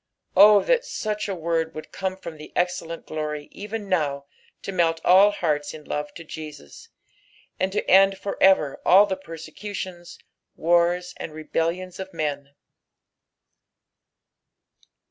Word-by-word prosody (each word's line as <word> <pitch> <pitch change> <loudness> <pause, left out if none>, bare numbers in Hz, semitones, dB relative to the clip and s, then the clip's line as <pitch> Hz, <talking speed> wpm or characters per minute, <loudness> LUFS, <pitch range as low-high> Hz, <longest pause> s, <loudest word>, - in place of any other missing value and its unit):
O 205 +2 +8
that - - +2
such 215 - -3
a 195 - -2
word 165 -1 -1
would 155 - -8
come 190 -1 -3
from 170 -4 -9
the 150 - -11
excellent 175 -2 -2
glory 150 -1 -4
even 210 +1 -6
now 145 -7 0 0.4
to - - -4
melt 165 -3 +1
all 190 +3 +7
hearts 155 -8 -2
in 155 - -11
love 150 0 -4
to 165 - -8
Jesus, 155 - -10 0.7
and 185 +1 0
to 200 - -2
end 195 +1 +6
for 200 +1 -4
ever 190 -7 +4
alt 200 +3 +6
the 190 - 0
persecutions, 185 +1 -8 0.4
wars, 175 +2 +2
and 155 - -7
rebellions 170 +4 -3
of 190 -2 -7
men 145 -2 -3
175 Hz, 135 wpm, -24 LUFS, 155-195 Hz, 0.7 s, O